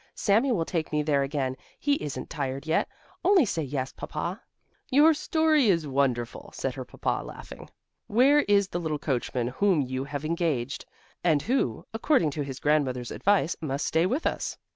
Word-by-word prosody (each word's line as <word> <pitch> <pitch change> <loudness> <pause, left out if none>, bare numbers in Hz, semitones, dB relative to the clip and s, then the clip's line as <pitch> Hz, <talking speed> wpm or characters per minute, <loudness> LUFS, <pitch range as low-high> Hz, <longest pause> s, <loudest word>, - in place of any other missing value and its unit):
Sami 230 +6 +2
will 170 -8 +1
take 165 -2 -2
me 150 -1 +1
there 145 -2 +2
again; 135 -2 -1 0.2
he 285 - +1
isn't 135 -3 -5
tired 135 -1 -3
yet. 160 - +1 0.3
Only 380 -7 +5
say 170 -6 -2
yes, 135 -2 -3
Papa." - - -5 0.5
"Your 300 +5 +6
story 310 -3 +2
is 170 -5 +2
wonderful," 130 -4 -1
said - - -2
her - - -6
Papa, - - -2
laughing. - - -10 0.4
"Where 265 +7 +5
is 200 -6 +3
the 175 - -3
little 160 -3 -2
coachman 125 -3 -1
whom 180 +4 +2
you 130 +1 -3
have 145 +1 -5
engaged 155 -6 -1 0.4
and 155 -4 +3
who, 260 +4 0
according 225 - +2
to 150 - -4
his 135 -2 -5
grandmother's 135 -5 0
advice, 195 -5 +2
must 140 -2 -2
stay 165 +3 +2
with 265 - -1
us?" - - -2
155 Hz, 170 wpm, -27 LUFS, 135-205 Hz, 0.5 s, Your